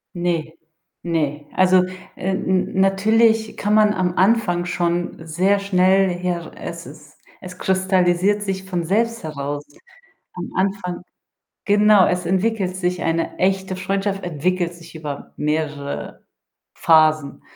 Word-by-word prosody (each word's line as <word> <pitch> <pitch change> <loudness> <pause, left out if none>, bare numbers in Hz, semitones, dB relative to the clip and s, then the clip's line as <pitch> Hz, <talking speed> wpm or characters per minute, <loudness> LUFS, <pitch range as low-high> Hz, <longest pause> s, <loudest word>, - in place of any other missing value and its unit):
Ne, 170 -3 -2 0.5
ne. 150 -4 -2
Also, 185 0 +5 0.3
äh, 190 - -2
n 190 0 0
natürlich 220 +3 +3
kann 205 +1 0
man 210 -1 +5
am 180 -3 -1
Anfang 190 -4 +2
schon 175 -1 -2
sehr 185 +5 +1
schnell 190 0 +3
her 175 -1 -3
es - - -7
ist - - -14 0.2
es 180 0 -10
kristallisiert 190 +1 +2
sich 190 -2 -3
von 180 -3 -3
selbst 230 +6 0
heraus. 145 -2 -4 0.7
Am 180 -1 -6
Anfang 190 -2 -1 0.6
genau, 205 -1 +5
es 180 -1 -1
entwickelt 190 +1 0
sich 180 -1 -2
eine 165 0 -1
echte 190 0 0
Freundschaft 195 +1 -2
entwickelt 175 +2 -1
sich 170 -1 -14
über 150 -3 -7
mehrere 150 -2 -3 0.5
Phasen. 155 -3 +3
180 Hz, 125 wpm, -21 LUFS, 170-195 Hz, 0.7 s, Also